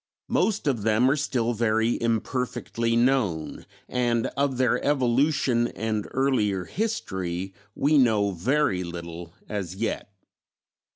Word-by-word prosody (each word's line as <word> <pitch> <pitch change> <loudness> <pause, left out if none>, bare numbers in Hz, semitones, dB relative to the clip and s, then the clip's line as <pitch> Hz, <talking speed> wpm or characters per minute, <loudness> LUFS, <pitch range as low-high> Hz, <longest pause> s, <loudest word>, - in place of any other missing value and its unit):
Most 215 -1 +1
of 130 -7 +1
them 110 +5 +3
are - - +3
still 125 -5 0
very 115 +1 +1
imperfectly 115 0 -1
known, 120 - 0 0.2
and 120 -2 0
of 140 -2 0
their 125 -1 +2
evolution 130 -2 +2
and 110 -3 -3
earlier 110 -9 +1
history 95 - -3 0.2
we 145 +1 +3
know 110 -5 +3
very 95 - +1
little 85 0 -8
as 95 -4 -4
yet. 110 -1 -3
115 Hz, 115 wpm, -26 LUFS, 100-130 Hz, 0.2 s, them